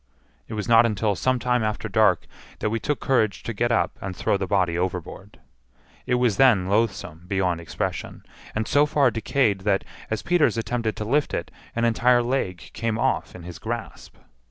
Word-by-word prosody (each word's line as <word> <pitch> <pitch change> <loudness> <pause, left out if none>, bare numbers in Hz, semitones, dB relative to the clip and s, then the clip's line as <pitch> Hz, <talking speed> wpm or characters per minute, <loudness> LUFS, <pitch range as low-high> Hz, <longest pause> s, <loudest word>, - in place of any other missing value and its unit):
It 110 - -6
was 105 +1 -3
not 115 0 +6
until 105 -1 0
some 130 +6 +1
time 125 -1 +1
after 110 -1 -2
dark - - +3 0.3
that 105 - -2
we 115 - -1
took 150 +2 -2
courage 110 -6 +1
to 120 - -4
get 120 +3 0
up 115 - 0
and 95 -1 -5
throw - - 0
the 95 -1 -2
body 90 -3 +1
overboard. 90 +2 -4 0.7
It 125 - +2
was 125 -4 +1
then 120 -9 +5
loathsome 100 -6 -1
beyond 90 -3 0
expression, 85 - -4 0.3
and 110 0 -1
so 145 +1 +4
far 140 -4 +3
decayed 110 -2 +1
that, 100 0 +1 0.3
as 110 - -2
Peters 175 -8 +2
attempted 115 -2 -2
to 105 - -4
lift 145 +6 +1
it, - - -4 0.2
an 115 0 +1
entire 120 +1 +3
leg 120 -8 -2
came 115 -1 -2
off - - -1
in 90 - -10
his 90 0 -9
grasp. 115 -1 -6
110 Hz, 185 wpm, -24 LUFS, 95-120 Hz, 0.7 s, not